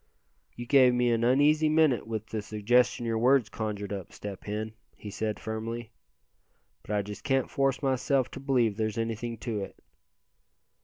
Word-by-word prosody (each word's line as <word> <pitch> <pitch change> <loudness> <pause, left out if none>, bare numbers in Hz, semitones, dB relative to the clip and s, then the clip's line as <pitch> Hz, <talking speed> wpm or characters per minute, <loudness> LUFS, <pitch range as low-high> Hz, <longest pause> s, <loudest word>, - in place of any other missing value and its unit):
"You 120 - -6
gave 130 -1 +5
me 125 -1 +2
an 115 0 +1
uneasy 150 +5 +4
minute 155 -7 +3
with 110 -1 -4
the 110 -1 -4
suggestion 120 +4 +1
your 115 -1 0
words 125 -1 +4
conjured 105 -3 -4
up, 95 -3 -6
Step 100 -2 -8
Hen," 110 +1 -4 0.2
he 105 - -9
said, 110 +1 -3
firmly; 110 +1 -5 0.9
"but - - -20
I 100 - +1
just 105 +1 -8
can't 135 -2 0
force 135 +1 0
myself 130 0 +1
to - - -7
believe 125 -6 +1
there's 110 -1 -2
anything 115 +1 -3
to 115 -4 -3
it." 95 - -7
115 Hz, 165 wpm, -28 LUFS, 110-130 Hz, 0.9 s, gave